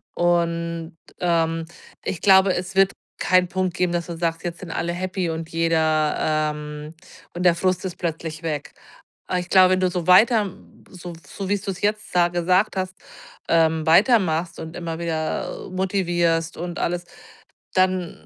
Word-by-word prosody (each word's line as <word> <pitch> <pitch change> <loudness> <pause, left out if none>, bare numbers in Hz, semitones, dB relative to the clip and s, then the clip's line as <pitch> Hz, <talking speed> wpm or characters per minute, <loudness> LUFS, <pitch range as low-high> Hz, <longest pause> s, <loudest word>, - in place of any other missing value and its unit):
Und, 170 -1 0 0.3
ähm, 165 -2 +1 0.4
ich 175 - -4
glaube, 190 -1 +6
es 180 +2 -5
wird 195 0 +5 0.3
keinen 185 0 +3
Punkt 185 0 -2
geben, 180 -1 0
dass 170 -1 -2
man 170 -1 -6
sagt, 165 -1 -1
jetzt 170 -1 -5
sind 175 -3 -8
alle 170 +1 -2
happy 185 0 -2
und 160 0 -5
jeder, 160 -2 +1 0.4
ähm 150 +1 -8 0.4
und 175 - -3
der 175 -2 +5
Frust 185 +1 0
ist 180 - -5
plötzlich 165 -1 -4
weg. 150 -2 -4 0.5
Aber 180 - 0
ich 180 - -7
glaube, 185 -1 +6
wenn 185 - +3
du 185 -1 +2
so 175 -2 -3
weiter 210 +1 +5 0.4
so 175 -1 -9
so 195 +5 -6
wie's 205 -1 0
du 200 - -2
es 190 - -9
jetzt 210 +1 -1
sa 175 -1 +4
gesagt 180 +4 +1
hast, 185 0 -2 0.6
ähm, 160 -1 +3
weitermachst 175 -3 +3
und 160 +1 -7
immer 165 -2 -5
wieder 160 -2 -3
motivierst 175 -3 0
und 175 +1 -5
alles, 175 0 -2 0.7
dann 185 -2 0
175 Hz, 165 wpm, -23 LUFS, 165-185 Hz, 0.7 s, glaube